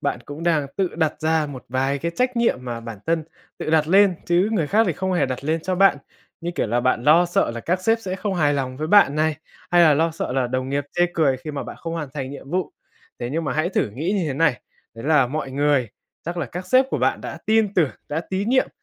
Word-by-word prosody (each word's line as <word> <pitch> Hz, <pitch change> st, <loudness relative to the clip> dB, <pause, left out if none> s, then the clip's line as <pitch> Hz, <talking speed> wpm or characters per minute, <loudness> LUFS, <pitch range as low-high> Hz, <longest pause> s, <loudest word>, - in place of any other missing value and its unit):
bạn 120 Hz, -, -2 dB
cũng 145 Hz, +3 st, -8 dB
đang 160 Hz, -4 st, +1 dB
tự 190 Hz, -3 st, -1 dB
đặt 160 Hz, -2 st, 0 dB
ra 160 Hz, -1 st, +1 dB
một 135 Hz, -4 st, -9 dB
vài 135 Hz, +2 st, 0 dB
cái 170 Hz, +4 st, -2 dB
trách 250 Hz, +7 st, -1 dB
nhiệm 235 Hz, -, +2 dB
mà 120 Hz, -2 st, -4 dB
bản 115 Hz, -3 st, -8 dB
thân 165 Hz, -1 st, 0 dB, 0.3 s
tự -, -, -3 dB
đặt 155 Hz, -1 st, +3 dB
lên, 195 Hz, +1 st, +5 dB
chứ 175 Hz, +4 st, +3 dB
người 175 Hz, -9 st, +1 dB
khác 215 Hz, +8 st, +3 dB
thì -, -, +1 dB
không 190 Hz, -1 st, -2 dB
hề 175 Hz, -, +2 dB
đặt 130 Hz, +1 st, -5 dB
lên 160 Hz, +2 st, 0 dB
cho 185 Hz, 0 st, -1 dB
bạn, 195 Hz, -3 st, +5 dB, 0.4 s
như 170 Hz, -, -3 dB
kiểu -, -, 0 dB
là, 120 Hz, +3 st, 0 dB
bạn 130 Hz, -1 st, +1 dB
lo 165 Hz, +4 st, +6 dB
sợ 175 Hz, -, +1 dB
là 115 Hz, 0 st, -6 dB
các 180 Hz, +6 st, -1 dB
sếp 225 Hz, +3 st, +3 dB
sẽ 185 Hz, -4 st, -4 dB
không 195 Hz, 0 st, -2 dB
hài 145 Hz, -4 st, +2 dB
lòng 130 Hz, -2 st, -3 dB
với 155 Hz, +3 st, -3 dB
bạn 195 Hz, -6 st, +5 dB
này, 155 Hz, 0 st, +1 dB, 0.3 s
hay 175 Hz, 0 st, +5 dB
là 155 Hz, -3 st, +6 dB
lo 165 Hz, +3 st, +2 dB
sợ 160 Hz, -5 st, -4 dB
là 130 Hz, -1 st, +1 dB
đồng 130 Hz, +1 st, -2 dB
nghiệp 140 Hz, +1 st, -1 dB
chê 175 Hz, 0 st, +3 dB
cười 140 Hz, -5 st, +2 dB
khi 155 Hz, +4 st, -7 dB
mà 145 Hz, -, -4 dB
bạn -, -, -8 dB
không 165 Hz, -1 st, -6 dB
hoàn 160 Hz, -4 st, -4 dB
thành 135 Hz, -2 st, -4 dB
nhiệm 140 Hz, -1 st, -10 dB
vụ, 180 Hz, +1 st, -1 dB, 0.5 s
thế 120 Hz, +1 st, -4 dB
nhưng 165 Hz, +2 st, -2 dB
mà -, -, -1 dB
hãy 155 Hz, +3 st, 0 dB
thử 150 Hz, -, 0 dB
nghĩ 155 Hz, -, -2 dB
như 195 Hz, -5 st, 0 dB
thế 135 Hz, -, -2 dB
này, 145 Hz, -4 st, +2 dB, 0.3 s
đấy 115 Hz, +3 st, -9 dB
là 150 Hz, -4 st, +4 dB
mọi 140 Hz, +1 st, -4 dB
người, 140 Hz, -3 st, +1 dB, 0.4 s
chắc 170 Hz, +2 st, -4 dB
là 170 Hz, -, -2 dB
các 180 Hz, +8 st, -7 dB
sếp 255 Hz, +7 st, +5 dB
của -, -, -1 dB
bạn -, -, +1 dB
đã -, -, -7 dB
tin 220 Hz, -2 st, +2 dB
tưởng, 160 Hz, -7 st, +3 dB, 0.2 s
đã 150 Hz, +2 st, -1 dB
tín 195 Hz, +3 st, -1 dB
nhiệm, 260 Hz, +1 st, +3 dB
155 Hz, 270 wpm, -22 LUFS, 135-180 Hz, 0.5 s, lo